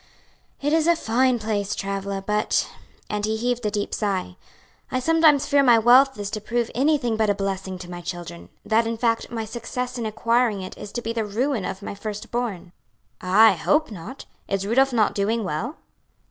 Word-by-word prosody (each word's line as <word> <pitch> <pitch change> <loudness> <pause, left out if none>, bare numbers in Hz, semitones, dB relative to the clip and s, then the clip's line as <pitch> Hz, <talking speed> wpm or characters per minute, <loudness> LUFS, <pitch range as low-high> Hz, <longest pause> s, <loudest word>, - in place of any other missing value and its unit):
"It 295 +2 +1
is 325 0 +3
a 340 - +5
fine 255 -2 +2
place, 210 -2 -2
Travilla, 195 0 -3
but," 210 0 +1 0.4
and 210 -1 -3
he 220 +1 0
heaved 245 +1 -1
a - - +1
deep 205 0 -3
sigh, 190 -4 -2 0.6
"I 255 - 0
sometimes 315 0 +4
fear 285 -1 +4
my 245 -4 +6
wealth 255 +4 +5
is 205 0 -4
to 215 - -4
prove 235 +2 -1
anything 265 -4 +1
but 220 -1 +2
a 205 - +2
blessing 195 -1 -3
to 180 -1 -9
my 175 0 -6
children; 170 - -7 0.2
that 225 +1 +2
in 230 0 -2
fact 230 -1 0
my 225 -2 -4
success 240 +2 -5
in 225 - -2
acquiring 225 -1 +1
it 185 - -8
is 205 - -9
to 240 - -4
be 230 - -2
the 225 -1 -1
ruin 225 +1 -1
of 190 +2 -5
my - - -5
first 210 +1 -7
born." 210 -8 -3 0.5
"Ah, 200 +5 +6
I - - +4
hope 295 - +1
not! 210 +8 -9 0.2
Is 195 0 -1
Rudolph 265 +6 +3
not 225 -4 +2
doing 215 +3 0
well?" 200 - -3
220 Hz, 200 wpm, -23 LUFS, 200-245 Hz, 0.6 s, my